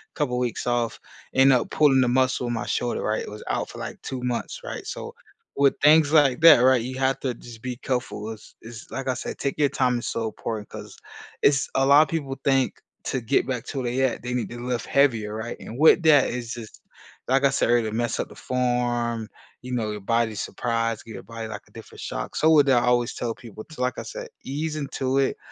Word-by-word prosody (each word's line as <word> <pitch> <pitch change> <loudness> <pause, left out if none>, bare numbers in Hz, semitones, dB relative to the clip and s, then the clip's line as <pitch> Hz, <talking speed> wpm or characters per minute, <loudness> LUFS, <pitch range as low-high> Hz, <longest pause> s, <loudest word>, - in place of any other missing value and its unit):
couple 125 -4 -1
weeks 125 -1 -2
off, 120 -1 0 0.3
end 135 0 +6
up 125 - +1
pulling 135 -4 +4
a - - +1
muscle 130 0 +1
in 120 - -1
my 115 - -3
shoulder, 120 - -1
right. 110 0 -1
It - - -8
was 105 0 -9
out - - -2
for, - - -10
like, - - -7
2 130 -2 -5
months, 125 -1 -3
right. - - -6
So, - - -6 0.4
with 140 -1 +3
things 150 0 +6
like 145 -4 +4
that, 165 -7 +9
right, 130 -1 +5
you 130 +2 -5
have 135 0 +1
to 130 -3 -1
just 115 -1 -12
be 125 -2 -5
careful. 125 -5 -3
It's 110 - -12
it's 115 -1 -11
like 135 -1 -4
I - - +2
said, 125 - -6
taking 140 +2 -1
your 140 - +4
time 125 -2 +1
is - - -5
so 115 - -2
important 110 -1 -5
'cause - - -10 0.4
it's 140 -1 +3
a 135 - +3
lot 140 +2 +7
of 155 - +3
people 140 -5 -3
think 135 -2 +2 0.3
to 130 - -2
get 120 +5 +1
back 125 -3 -2
to 140 - -4
where 120 - -2
they 130 +2 0
at, 130 -3 0
they 125 0 -3
need 125 - -2
to 120 0 -8
lift 125 -1 -3
heavier, 115 -7 +2
right. 110 +2 -5
And 115 - -8
with 160 +2 +6
that 150 -4 +5
is 120 -2 -5
just 115 -2 -10 0.5
like 135 +1 +3
I 140 - +6
said, 135 - +1
earlier, 120 -2 +2
mess 120 0 -1
up - - -1
the - - -12
form, 120 -2 -1 0.3
you 125 0 -8
know, 110 -3 -1
your 105 -1 -6
body's 115 0 0
surprised, 115 -2 -2
give 115 - -9
your - - -7
body, 115 -1 -7
like, 105 -2 -7
a - - -24
different 115 - -12
shock. - - -5
So 160 - +3
with 150 -3 +6
that, 125 -3 +4
I - - 0
always 120 0 +2
tell 115 -2 -3
people 110 -2 -11
to 155 -5 -10
like 125 -1 -1
I - - -5
said, - - -7
"Ease 150 +3 -3
into 135 -2 -1
it. 135 - +1
125 Hz, 240 wpm, -24 LUFS, 115-135 Hz, 0.5 s, that